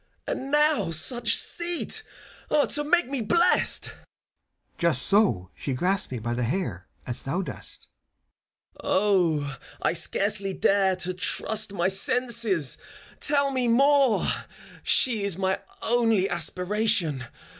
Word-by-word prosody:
And 270 Hz, -, -4 dB
now 295 Hz, -, +2 dB
such 230 Hz, +10 st, +1 dB
seat, 345 Hz, +5 st, 0 dB, 0.7 s
to 295 Hz, -, +1 dB
make 345 Hz, +4 st, +2 dB
me 270 Hz, -2 st, -3 dB
blest! 340 Hz, +12 st, +2 dB
CHIRON. -, -, -17 dB, 0.8 s
Just 170 Hz, -7 st, +1 dB
so 195 Hz, -, +1 dB
she 135 Hz, -, -5 dB
grasped 185 Hz, +5 st, -1 dB
me 125 Hz, -, -3 dB
by 120 Hz, +1 st, -3 dB
the 120 Hz, -, -3 dB
hair 120 Hz, -, -3 dB, 0.2 s
As 120 Hz, -, -6 dB
thou 175 Hz, +8 st, -2 dB
dost. -, -, -10 dB, 0.9 s
FAUST. 185 Hz, -6 st, +2 dB
0, 135 Hz, -1 st, -7 dB, 0.3 s
I -, -, +2 dB
scarcely 195 Hz, +3 st, 0 dB
dare 195 Hz, 0 st, +2 dB
To 185 Hz, 0 st, -1 dB
trust 210 Hz, +3 st, -1 dB
my 175 Hz, -2 st, 0 dB
senses 200 Hz, -, +1 dB, 0.3 s
I -, -, -24 dB
— -, -, -34 dB
tell 280 Hz, -1 st, +2 dB
me 255 Hz, -2 st, 0 dB
more! 275 Hz, 0 st, +3 dB, 0.5 s
She 230 Hz, -5 st, +1 dB
is 200 Hz, -4 st, 0 dB
my 190 Hz, 0 st, 0 dB, 0.2 s
only 225 Hz, -5 st, +2 dB
aspiration 180 Hz, -, 0 dB
200 Hz, 135 wpm, -25 LUFS, 170-240 Hz, 0.9 s, more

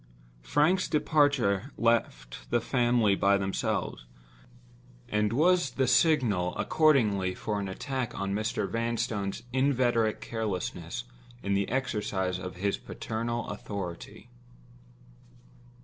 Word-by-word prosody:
Frank's 155 Hz, -, +2 dB
departure 140 Hz, -, +2 dB
left 110 Hz, -, 0 dB
the -, -, +2 dB
family 120 Hz, -4 st, +2 dB
by 100 Hz, +1 st, +3 dB
themselves, 95 Hz, -10 st, -2 dB, 1.0 s
and 105 Hz, -2 st, +1 dB
was 175 Hz, +4 st, +3 dB
the 135 Hz, -, +2 dB
signal 125 Hz, -, +2 dB
accordingly 105 Hz, -12 st, +2 dB
for 105 Hz, -2 st, -3 dB
an 100 Hz, -, -3 dB
attack 130 Hz, +5 st, -4 dB
on 100 Hz, 0 st, -2 dB
Mr. 110 Hz, +2 st, -1 dB
Vanstone's 115 Hz, -3 st, -2 dB
inveterate 125 Hz, -5 st, +2 dB
carelessness 105 Hz, -, -4 dB, 0.4 s
in 100 Hz, -, 0 dB
the 100 Hz, 0 st, 0 dB
exercise 105 Hz, -7 st, -1 dB
of 90 Hz, 0 st, -6 dB
his 100 Hz, +2 st, -1 dB
paternal 115 Hz, +1 st, -4 dB
authority. 100 Hz, +2 st, -7 dB
110 Hz, 100 wpm, -29 LUFS, 100-130 Hz, 1.0 s, by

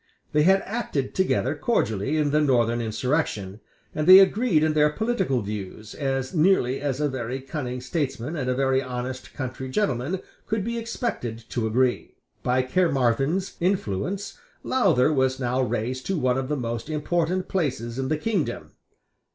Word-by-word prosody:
They 150 Hz, -, +3 dB
had 190 Hz, +5 st, +4 dB
acted 200 Hz, -, -3 dB
together 180 Hz, -7 st, +1 dB
cordially 145 Hz, -, 0 dB
in 150 Hz, -2 st, +1 dB
the 150 Hz, +1 st, +3 dB
Northern 120 Hz, -4 st, +2 dB
insurrection; 110 Hz, -4 st, -1 dB, 0.3 s
and 155 Hz, 0 st, -2 dB
they 185 Hz, +1 st, +11 dB
agreed 195 Hz, -3 st, +4 dB
in 155 Hz, -1 st, +2 dB
their 150 Hz, 0 st, +4 dB
political 190 Hz, -, 0 dB
views, 105 Hz, +1 st, -6 dB
as 135 Hz, -2 st, -2 dB
nearly 155 Hz, -7 st, +3 dB
as 140 Hz, -2 st, -2 dB
a 150 Hz, -, +2 dB
very 130 Hz, -1 st, -4 dB
cunning 130 Hz, -2 st, -5 dB
statesman 135 Hz, 0 st, -3 dB
and 130 Hz, -5 st, -2 dB
a 125 Hz, -, +1 dB
very 135 Hz, 0 st, +2 dB
honest 130 Hz, 0 st, -6 dB
country 130 Hz, -1 st, -5 dB
gentleman 140 Hz, -, -1 dB, 0.3 s
could 215 Hz, -2 st, -1 dB
be 235 Hz, +2 st, -2 dB
expected 175 Hz, -, -4 dB
to 115 Hz, -3 st, -1 dB
agree, 125 Hz, +3 st, 0 dB, 0.3 s
By 130 Hz, +1 st, +1 dB
Caermarthen's 135 Hz, +3 st, +1 dB
influence 185 Hz, -, -2 dB, 0.2 s
Lowther 165 Hz, -, +3 dB
was 130 Hz, -1 st, +1 dB
now 125 Hz, 0 st, 0 dB
raised 125 Hz, +1 st, -2 dB
to 190 Hz, -, 0 dB
one 130 Hz, -3 st, +1 dB
of 130 Hz, -, -4 dB
the 150 Hz, -, 0 dB
most 120 Hz, +3 st, -4 dB
important 170 Hz, +4 st, 0 dB
places 135 Hz, -9 st, -2 dB
in 130 Hz, -, -1 dB
the 155 Hz, -, 0 dB
kingdom. 195 Hz, 0 st, -2 dB
135 Hz, 160 wpm, -25 LUFS, 125-170 Hz, 0.3 s, they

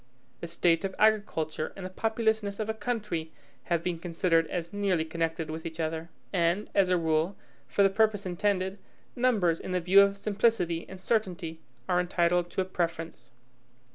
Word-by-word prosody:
The 170 Hz, -, -5 dB
state 170 Hz, +1 st, +2 dB
of 190 Hz, -1 st, -3 dB
agriculture 200 Hz, -8 st, +1 dB
and 195 Hz, -, -7 dB
the -, -, -4 dB
populousness 220 Hz, -1 st, 0 dB
of 215 Hz, -, -2 dB
a 220 Hz, -, 0 dB
country 210 Hz, -9 st, -3 dB, 0.3 s
have 170 Hz, -1 st, 0 dB
been 175 Hz, -2 st, -2 dB
considered 165 Hz, -1 st, +1 dB
as 170 Hz, +2 st, -4 dB
nearly 195 Hz, -5 st, +1 dB
connected 165 Hz, -1 st, -2 dB
with 160 Hz, +1 st, -5 dB
each 160 Hz, 0 st, -7 dB
other. 160 Hz, +1 st, -2 dB, 0.2 s
And, 175 Hz, +3 st, +1 dB
as 195 Hz, -2 st, +3 dB
a 180 Hz, -, +3 dB
rule, 160 Hz, +3 st, +1 dB, 0.3 s
for 200 Hz, -, +2 dB
the 195 Hz, -, +6 dB
purpose 215 Hz, -1 st, +2 dB
intended, 190 Hz, +1 st, -1 dB, 0.4 s
numbers, 215 Hz, -10 st, +2 dB
in 185 Hz, -, -5 dB
the 180 Hz, -, +2 dB
view 185 Hz, +3 st, +6 dB
of 200 Hz, 0 st, +3 dB
simplicity 200 Hz, -5 st, +1 dB
and 190 Hz, -, -9 dB
certainty, 180 Hz, -6 st, -1 dB, 0.3 s
are 180 Hz, -1 st, +2 dB
entitled 175 Hz, 0 st, +1 dB
to 190 Hz, -, -1 dB
a -, -, -1 dB
preference. 170 Hz, -3 st, -3 dB
180 Hz, 170 wpm, -29 LUFS, 165-200 Hz, 0.4 s, the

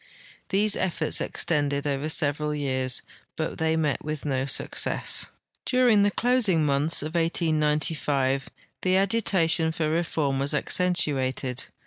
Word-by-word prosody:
These 205 Hz, +2 st, +3 dB
efforts 165 Hz, -4 st, 0 dB
extended 145 Hz, -3 st, -1 dB
over 145 Hz, +1 st, -2 dB
several 150 Hz, 0 st, 0 dB
years, 130 Hz, -3 st, -1 dB, 0.3 s
hut -, -, -4 dB
they 160 Hz, 0 st, +1 dB
met 155 Hz, -3 st, -1 dB
with 150 Hz, -1 st, -5 dB
no 135 Hz, -2 st, -1 dB
success. 135 Hz, -, +1 dB, 0.4 s
During 250 Hz, -5 st, +3 dB
the 205 Hz, -, +3 dB
closing 215 Hz, -8 st, +1 dB
months 145 Hz, +2 st, +1 dB
of 155 Hz, +2 st, -6 dB
1895 150 Hz, -4 st, 0 dB, 0.3 s
the 185 Hz, 0 st, +2 dB
agitation 190 Hz, -5 st, +2 dB
for 155 Hz, -1 st, -2 dB
reform 155 Hz, -4 st, -1 dB
was 140 Hz, +2 st, +2 dB
accentuated. 140 Hz, -7 st, 0 dB
155 Hz, 120 wpm, -25 LUFS, 140-175 Hz, 0.4 s, These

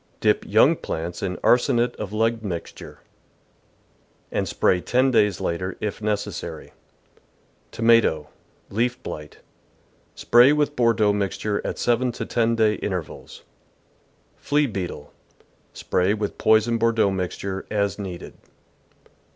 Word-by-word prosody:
— -, -, -37 dB
Dip -, -, +2 dB
young -, -, +5 dB
plants 85 Hz, +2 st, -5 dB
in 90 Hz, -2 st, -3 dB
arsenate 120 Hz, 0 st, +3 dB
of 105 Hz, -2 st, -6 dB
lead 115 Hz, +1 st, 0 dB
mixture, 90 Hz, -5 st, -7 dB, 1.3 s
and -, -, -1 dB
spray 90 Hz, -, +1 dB
ten 130 Hz, +5 st, +2 dB
days 105 Hz, -6 st, +2 dB
later, 90 Hz, +2 st, -3 dB
if 105 Hz, 0 st, -4 dB
necessary. 105 Hz, -1 st, -4 dB, 1.0 s
Tomato. 115 Hz, -10 st, +3 dB, 0.2 s
— -, -, -37 dB
Leaf 120 Hz, +4 st, 0 dB
Blight. 75 Hz, 0 st, -8 dB, 0.4 s
— -, -, -38 dB
Spray 120 Hz, +4 st, +5 dB
with 150 Hz, -1 st, 0 dB
Bordeaux 115 Hz, -4 st, +3 dB
mixture 100 Hz, +1 st, -2 dB
at -, -, -4 dB
seven 120 Hz, +1 st, +1 dB
to -, -, -5 dB
ten 115 Hz, 0 st, +1 dB
day 110 Hz, -1 st, +3 dB
intervals. 90 Hz, -5 st, -6 dB, 0.9 s
Flea 145 Hz, +1 st, +1 dB
Beetle. 90 Hz, -, -6 dB, 0.3 s
— -, -, -38 dB
Spray 95 Hz, +3 st, +1 dB
with 105 Hz, -1 st, -4 dB
poisoned 110 Hz, +1 st, +3 dB
Bordeaux 115 Hz, -3 st, +2 dB
mixture 95 Hz, +1 st, -4 dB
as 100 Hz, -2 st, -1 dB
needed. 95 Hz, -3 st, -7 dB
105 Hz, 125 wpm, -23 LUFS, 95-115 Hz, 1.3 s, young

